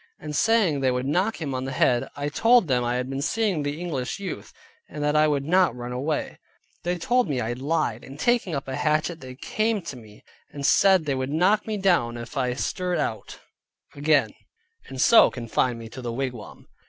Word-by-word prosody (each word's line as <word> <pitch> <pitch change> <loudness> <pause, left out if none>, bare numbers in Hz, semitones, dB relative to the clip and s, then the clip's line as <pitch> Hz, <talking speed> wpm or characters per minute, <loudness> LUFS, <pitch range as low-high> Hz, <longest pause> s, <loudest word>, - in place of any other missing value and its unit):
and 150 - -6
saying 210 -7 +3
they 135 -1 +2
would 125 0 -1
knock 185 +10 0
him 145 -5 -3
on 130 0 -3
the 135 - -4
head. 125 -1 +1
I 145 0 -3
told 225 +7 +4
them 125 -3 +1
I 120 0 -1
had 125 0 -2
been 135 +1 -4
seeing 200 0 0
the 145 +2 -3
English 150 -8 -3
youth, 195 -4 -6 0.4
and 150 - -5
that 150 +1 +1
I 155 0 +5
would 140 -2 0
not 180 -4 +3
run 120 0 -6
away. 140 +5 -3 0.4
They 175 +1 -2
told 245 +5 +1
me 135 -3 -1
I 115 0 -2
lied, 130 -3 -1
and 135 +2 -11
taking 235 -7 +1
up 135 - -4
a 130 - -3
hatchet, 155 +2 0
they 130 -1 -9
came 215 - -1
to 165 - -7
me, 110 -4 -15 0.3
and 140 -1 -5
said 190 0 +4
they 140 - 0
would 130 0 -2
knock 185 +9 +2
me 215 -1 -2
down 170 -12 +1
if 120 +3 -9
I 125 -2 0
stirred 180 +5 -2
out 115 -7 -4 0.5
again, 145 +1 +2 0.5
and 135 - -8
so 230 - +7
confined 120 0 -1
me 115 -1 -8
to 130 - -9
the 120 -1 -4
wigwam. 125 -2 -6
145 Hz, 210 wpm, -25 LUFS, 125-175 Hz, 0.5 s, so